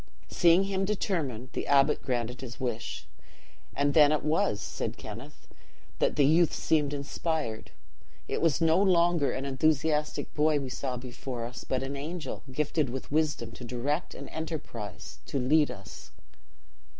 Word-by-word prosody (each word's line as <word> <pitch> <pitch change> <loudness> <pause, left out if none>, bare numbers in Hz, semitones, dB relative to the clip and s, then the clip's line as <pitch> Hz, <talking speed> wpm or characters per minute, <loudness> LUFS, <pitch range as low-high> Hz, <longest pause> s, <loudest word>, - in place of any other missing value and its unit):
"Seeing 175 +2 +5
him 195 -1 -1
determined 160 - -1
the - - -3
abbot 140 -1 +4
granted 125 -1 -2
his 125 -2 -8
wish; 120 -3 -3 0.7
'and 145 0 +2
then 150 -1 +7
it 155 - +1
was,' 150 -9 +1
said - - -4
Kenneth, 120 +8 -10 0.5
'that - - +2
the 145 - +4
youth 160 +3 +4
seemed 150 -3 +1
inspired. 145 -4 -3 0.6
It - - -2
was 160 -4 +3
no 165 +3 +4
longer 175 -6 +3
an 135 +1 -3
enthusiastic 150 +2 +1
boy 150 0 +3
we 135 -2 -4
saw 125 0 -3
before 120 -1 -5
us, 125 +1 -7
but 130 0 -1
an 135 +1 -4
angel, 155 +4 -5
gifted 150 +1 0
with 130 +2 -6
wisdom 150 -7 0
to 125 - -10
direct 130 +7 -2
and - - -8
enterprise 145 - -6
to - - -2
lead 145 +4 +4
us. 95 -1 -10
145 Hz, 150 wpm, -29 LUFS, 125-160 Hz, 0.7 s, then